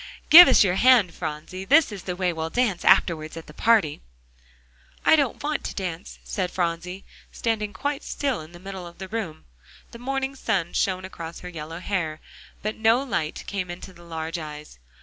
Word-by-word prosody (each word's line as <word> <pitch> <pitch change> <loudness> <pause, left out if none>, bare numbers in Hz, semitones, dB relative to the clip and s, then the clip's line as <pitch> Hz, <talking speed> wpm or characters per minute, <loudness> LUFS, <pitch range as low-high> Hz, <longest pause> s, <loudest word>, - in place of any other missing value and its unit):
give 350 +3 +12
us 265 - +6
your 185 -3 +2
hand, 235 -8 +5
Phronsie, 160 +3 -6
this 290 +6 +4
is 200 -2 -7
the 180 0 -4
way 180 -1 0
we'll 160 0 -3
dance 225 -4 0
afterwards 160 -2 +3
at 165 - -8
the 150 - -13
party." 210 -7 +2 1.0
"I - - +7
don't 285 -4 0
want 300 0 -2
to - - -5
dance," 180 -2 -5
said 185 -3 -2
Phronsie, 180 +2 -3 0.3
standing 215 -3 -2
quite 285 +9 -3
still 275 - -2
in 155 +2 -12
the 175 - -13
middle 190 -1 -8
of 170 - -14
the 190 - -7
room. 185 -7 -5 0.5
The 235 - -11
morning 270 +2 -2
sun 180 -9 -1
shone 185 -1 0
across 170 -3 -8
her 180 - -7
yellow 165 -1 -7
hair, 170 -4 -3 0.4
but 215 +1 -3
no 225 +4 +3
light 160 - -3
came 190 -3 -4
into 180 +2 -8
the 175 - -17
large 165 0 -5
eyes. 150 - -9
185 Hz, 190 wpm, -24 LUFS, 165-225 Hz, 1.0 s, give